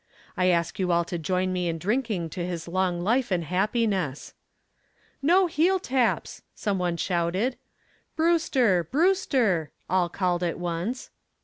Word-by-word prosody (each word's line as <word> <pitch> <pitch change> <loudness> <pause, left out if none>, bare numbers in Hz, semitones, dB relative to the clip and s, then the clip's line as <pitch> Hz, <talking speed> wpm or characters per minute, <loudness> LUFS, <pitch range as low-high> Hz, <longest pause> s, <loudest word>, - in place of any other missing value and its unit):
I 185 -2 +2
ask 170 -1 +1
you 180 -2 +1
all 170 0 +2
to 175 0 -4
join 185 +3 0
me 180 -1 -1
in 165 - -2
drinking 205 -3 -1
to 175 - -4
his 175 -2 -4
long 180 0 0
life 240 +5 +1
and 180 -3 0
happiness." 190 - -1 0.9
"No 355 +7 +4
heel 345 +3 +2
taps!" 260 -9 -1
some 200 -3 -1
one 175 -1 -1
shouted. 185 +8 0 0.6
"Brewster! 275 - +2
Brewster!" 260 - +1 0.2
all 180 -1 +1
called 180 -1 -1
at 175 -2 -1
once. 175 +8 -4
185 Hz, 140 wpm, -26 LUFS, 175-245 Hz, 0.9 s, No